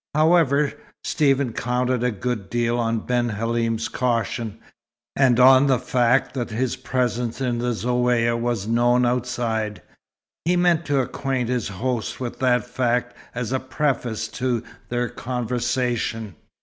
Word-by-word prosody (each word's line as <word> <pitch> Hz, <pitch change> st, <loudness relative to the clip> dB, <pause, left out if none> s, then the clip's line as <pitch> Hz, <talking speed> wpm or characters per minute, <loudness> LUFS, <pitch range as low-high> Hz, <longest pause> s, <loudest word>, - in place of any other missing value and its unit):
However, 155 Hz, -3 st, +3 dB, 0.3 s
Stephen 135 Hz, -5 st, +1 dB
counted 125 Hz, +1 st, 0 dB
a 125 Hz, -, +2 dB
good 110 Hz, -1 st, -3 dB
deal 120 Hz, 0 st, 0 dB
on 115 Hz, -1 st, 0 dB
Ben 120 Hz, -1 st, +1 dB
Halim's 115 Hz, +1 st, -1 dB
caution, 115 Hz, -3 st, -1 dB, 0.6 s
and 130 Hz, -3 st, +4 dB
on 130 Hz, +2 st, +7 dB
the 130 Hz, -2 st, +4 dB
fact 125 Hz, +1 st, +1 dB
that 125 Hz, -3 st, -3 dB
his 120 Hz, +3 st, -1 dB
presence 125 Hz, -2 st, -2 dB
in 125 Hz, -3 st, -1 dB
the 125 Hz, +1 st, -1 dB
Zaouïa 120 Hz, 0 st, +1 dB
was 115 Hz, -3 st, -2 dB
known 120 Hz, +2 st, +3 dB
outside. 120 Hz, -4 st, -1 dB, 0.6 s
He 175 Hz, +3 st, +2 dB
meant 175 Hz, -2 st, +2 dB
to 140 Hz, -2 st, +2 dB
acquaint 130 Hz, -1 st, -2 dB
his 125 Hz, -4 st, -1 dB
host 115 Hz, +4 st, -3 dB
with 125 Hz, -2 st, -5 dB
that 125 Hz, -2 st, +2 dB
fact 125 Hz, 0 st, -1 dB, 0.2 s
as 125 Hz, -1 st, -3 dB
a 130 Hz, -, +1 dB
preface 130 Hz, -5 st, -1 dB
to 125 Hz, -2 st, -1 dB, 0.3 s
their 120 Hz, 0 st, 0 dB
conversation. 120 Hz, -3 st, -2 dB
125 Hz, 135 wpm, -23 LUFS, 115-130 Hz, 0.6 s, on